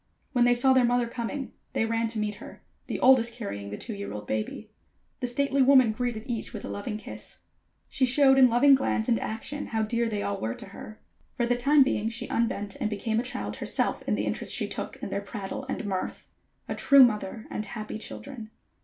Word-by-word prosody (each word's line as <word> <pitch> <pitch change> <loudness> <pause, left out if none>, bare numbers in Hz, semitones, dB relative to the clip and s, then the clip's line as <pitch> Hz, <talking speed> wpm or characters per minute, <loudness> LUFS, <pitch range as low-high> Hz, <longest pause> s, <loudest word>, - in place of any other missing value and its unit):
When 245 -3 +3
they 245 0 +5
saw 260 +2 +4
their 260 -1 +5
mother 245 0 +2
coming, 240 +3 -4 0.2
they 225 - +1
ran 230 0 0
to 225 0 -6
meet 210 -1 -1
her, - - -11 0.2
the - - -3
oldest 240 -3 +5
carrying 100 - -5
the 105 - -5
two 230 - -6
year 200 0 -6
old 105 0 -6
baby. 110 - -4 0.5
The 250 - -2
stately 275 +2 +1
woman 260 -3 +6
greeted 230 -1 -3
each 235 -4 -4
with - - -6
a - - -6
loving 210 +1 -4
kiss. 215 - -10 0.5
She 260 - +1
showed 270 +1 +5
in 255 -1 +8
loving 260 +4 +6
glance 260 -4 +1
and 235 -3 +2
action 250 +7 -4
how 220 -1 -1
dear 230 +2 0
they 210 -2 -2
all 200 -1 -3
were 115 +1 -2
to 205 - -11
her. 215 +2 -10 0.4
For 240 - +2
the 245 +1 +2
time 275 +4 +5
being 220 -4 0
she 230 +2 -4
unbent, 205 -3 -1
and 215 - -1
became 220 +1 -1
a - - +2
child 250 +2 -4
herself - - -1
in - - +2
the - - -1
interest - - -2
she - - 0
took - - -5
in - - -4
their 200 - -1
prattle 200 +5 -6
and 245 - -3
mirth. 190 -2 -4 0.4
A - - -2
true 280 -2 +7
mother 215 -2 0
and 215 - -3
happy 215 0 -6
children. 240 -1 -8
230 Hz, 220 wpm, -27 LUFS, 215-255 Hz, 0.5 s, in